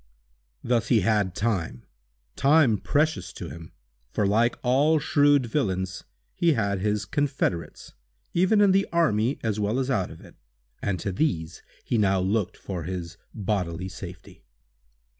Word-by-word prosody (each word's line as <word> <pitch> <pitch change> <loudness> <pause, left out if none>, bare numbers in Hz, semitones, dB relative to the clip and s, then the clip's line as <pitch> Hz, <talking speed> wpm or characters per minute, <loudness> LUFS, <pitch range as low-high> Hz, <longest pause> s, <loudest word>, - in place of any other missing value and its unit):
Thus 120 -1 +1
he 115 -5 +4
had 100 -3 +1
time—time 90 - 0
precious 155 +2 0
to - - -7
him—for, 60 - -7
like 115 +4 +2
all 140 +6 +3
shrewd 145 -3 +3
villains, 95 -7 -2 0.3
he 170 -2 +2
had 100 -5 0
his 105 +1 -1
confederates, 130 - -2 0.4
even 190 +4 +3
in 200 -2 +5
the 195 +1 +2
army 130 -7 +2
as 110 -2 -1
well 105 +3 0
as 135 0 -1
out 95 -7 0
of - - -11
it, - - -15 0.5
and 95 -3 -1
to 100 - -2
these 90 - -2 0.2
he 115 - 0
now 95 -2 +3
looked 95 +1 -1
for 95 -3 -5
his 90 -1 -6
bodily 95 -4 -2
safety. 90 -1 -10
105 Hz, 140 wpm, -26 LUFS, 90-135 Hz, 0.5 s, in